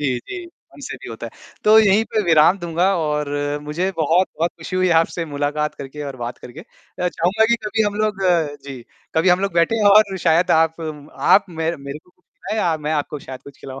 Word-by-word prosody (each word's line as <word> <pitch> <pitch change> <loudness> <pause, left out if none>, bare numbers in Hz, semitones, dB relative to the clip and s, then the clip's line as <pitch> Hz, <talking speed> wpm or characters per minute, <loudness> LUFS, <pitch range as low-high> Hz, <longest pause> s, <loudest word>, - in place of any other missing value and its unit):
जी, 130 -4 0
जी। 350 - -8 0.3
हमसे - - -8
भी - - -8
होता - - -7
है, - - -9 0.3
तो 215 +1 +7
यहीं 215 +1 +4
पे 215 - -1
विराम 165 +3 +5
दूँगा 170 0 0
और 150 -2 -1 0.3
मुझे 170 +6 -2
बहुत-बहुत 165 +1 +1
खुशी 170 +2 -6
हुई 185 0 +2
आपसे 165 0 -3
मुलाकात 150 0 -2
करके 140 +2 -8
और 135 - -8
बात 120 0 -6
करके 130 +6 -11
अ, 180 -2 -6
चाहूँगा 185 +6 +1
कि 235 - +3
कभी 220 +1 0
हम 205 -1 -1
लोग 215 -1 0 0.5
जी, 135 -4 -8 0.3
कभी 165 +3 +3
हम 180 +1 +4
लोग 195 -1 -1
बैठें 175 +7 +2
और 200 -1 +5
शायद 170 +1 +2
आप 160 +1 +2
आप 155 +5 +1
मेरे 165 0 -3
मेरे 140 +1 -8
को 180 - -26
कुछ 180 - -41
खिलाएँ 220 - -6
या 165 -2 +1
मैं 150 +1 -3
आपको 150 0 -2
शायद 130 -1 -10
कुछ 140 -1 -14
खिलाऊँ। 135 0 -9
165 Hz, 210 wpm, -20 LUFS, 150-190 Hz, 0.5 s, तो